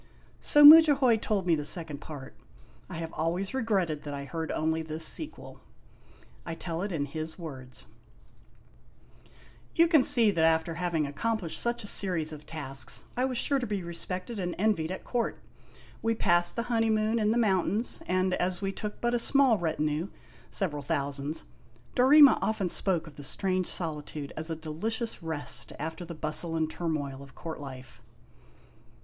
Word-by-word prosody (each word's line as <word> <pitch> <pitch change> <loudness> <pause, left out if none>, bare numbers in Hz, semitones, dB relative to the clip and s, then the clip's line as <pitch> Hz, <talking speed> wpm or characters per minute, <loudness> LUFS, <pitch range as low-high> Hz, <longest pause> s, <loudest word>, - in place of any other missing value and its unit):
So 295 - +5
Mudjahoy 290 -6 +8
told 210 -3 -1
me 175 - +3
the 150 -2 0
second 160 -2 -1
part. 145 -4 -9 0.6
I - - -7
have 165 0 -5
always 175 - -2
regretted 195 - 0
that 145 -2 -6
I 140 0 -6
heard 160 +2 -4
only 160 +1 0
this 160 0 -4
sequel. 310 - -4 0.8
I 165 - -5
tell 165 0 -5
it 200 +1 -3
in 150 -5 -1
his 155 +2 -6
words: 130 -7 -7 1.9
You 335 +1 +5
can 320 -4 +5
see 230 -4 +4
that 165 -4 +1
after 160 +1 +2
having 165 -2 -1
accomplished 170 +2 -2
such 235 0 -1
a - - -6
series 175 -7 -1
of 150 0 -11
tasks 135 -6 -2
I 250 - +1
was 255 -2 -2
sure 280 +3 +2
to 245 - -3
be 205 -3 -3
respected 185 +6 -5
and 175 -2 -3
envied 195 -6 +1
at 185 - -6
court. 240 -2 -2 0.6
We 225 0 0
passed 175 -4 +2
the 235 - -1
honeymoon 225 -1 +1
in 210 -1 +1
the 225 - +2
mountains, 210 +1 +1
and 185 0 +1
as 180 0 0
we 195 -1 -2
took 210 +2 -6
but 240 0 0
a 240 - +2
small 260 -3 +4
retinue, 155 0 -1 0.4
several 150 -7 -1
thousands, 140 +2 -2 0.5
Dorema 280 +2 +7
often 205 -4 -1
spoke 175 -2 0
of 155 -3 -14
the 145 - -8
strange 185 +4 -1
solitude 150 -3 -5
as 160 +1 -5
a 165 - -2
delicious 215 +10 -2
rest 160 -3 -1
after 160 +4 -5
the 170 0 -8
bustle 155 +2 +1
and 160 -1 -1
turmoil 145 -6 -3
of 135 -1 -14
court 160 -2 -7
life. 130 -2 -10
170 Hz, 165 wpm, -28 LUFS, 155-220 Hz, 1.9 s, Mudjahoy